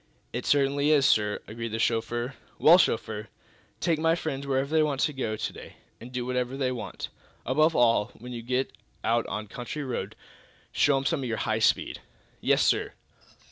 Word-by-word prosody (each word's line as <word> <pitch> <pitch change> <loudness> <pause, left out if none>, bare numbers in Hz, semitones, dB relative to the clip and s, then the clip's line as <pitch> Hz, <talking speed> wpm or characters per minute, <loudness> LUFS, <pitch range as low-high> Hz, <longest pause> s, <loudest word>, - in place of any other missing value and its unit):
"It - - -3
certainly 140 +1 +3
is, 145 -3 +5
sir," 105 -5 +3
agreed 115 +2 -5
the - - 0
chauffeur. 120 +3 0 0.2
"Well, 170 +4 +7
chauffeur, 110 - 0 0.5
take 165 -3 +1
my 165 +1 +3
friends 140 -4 -4
wherever 135 +2 0
they 160 - +5
want 145 -3 0
to 150 - +1
go 115 -5 -2
to - - -4
day, - - -11 0.2
and 120 +2 -10
do 125 -1 -3
whatever 125 +1 -1
they 130 -2 0
want. 120 -5 -5 0.4
Above 155 +4 +3
all, 115 -3 +4
when 125 +2 -8
you 120 - -5
get 125 +3 -1 0.3
out 115 +1 +1
on 105 - -4
a - - -21
country 125 +7 -5
road, 130 -3 -4 0.6
show 145 -2 +3
'em 135 - -2
some 165 +1 +1
of 130 - -3
your 115 - -1
high 110 0 0
speed." 110 - +1 0.4
"Yes, - - +3
sir." - - +1
125 Hz, 190 wpm, -27 LUFS, 115-140 Hz, 0.6 s, Well